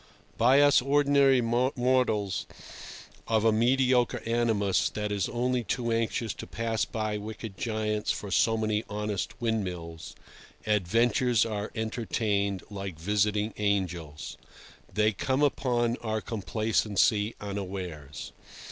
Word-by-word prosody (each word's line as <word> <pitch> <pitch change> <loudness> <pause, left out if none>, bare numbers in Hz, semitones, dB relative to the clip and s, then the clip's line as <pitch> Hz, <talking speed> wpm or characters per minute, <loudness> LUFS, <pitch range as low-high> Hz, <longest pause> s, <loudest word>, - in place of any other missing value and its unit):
By 130 +5 +5
us 145 -2 +6
ordinary 140 -1 +4
mortals 125 -3 +1 0.8
of 110 -1 +2
a 110 - +6
mediocre 125 +2 +2
animus 110 -6 +1
that 105 -1 -3
is 100 -3 -1
only 125 +1 0
too 120 0 -2
anxious 115 -1 -1
to - - -9
pass 115 -1 -1
by 110 -2 -3
wicked 110 -1 -7
giants 110 -1 -2
for 100 - -2
so 110 +5 +3
many 110 0 0
honest 105 -2 -3
windmills, 90 -8 -3 0.5
adventures 115 +4 +2
are 105 -2 -3
entertained 110 -3 -1
like 95 -4 -6
visiting 105 +4 0
angels. 90 -7 -2 0.5
They 105 +1 +2
come 130 +7 0
upon 120 -4 +1
our 110 -1 -2
complacency 105 +1 0
unawares. 90 -8 -6
110 Hz, 110 wpm, -28 LUFS, 100-120 Hz, 0.8 s, us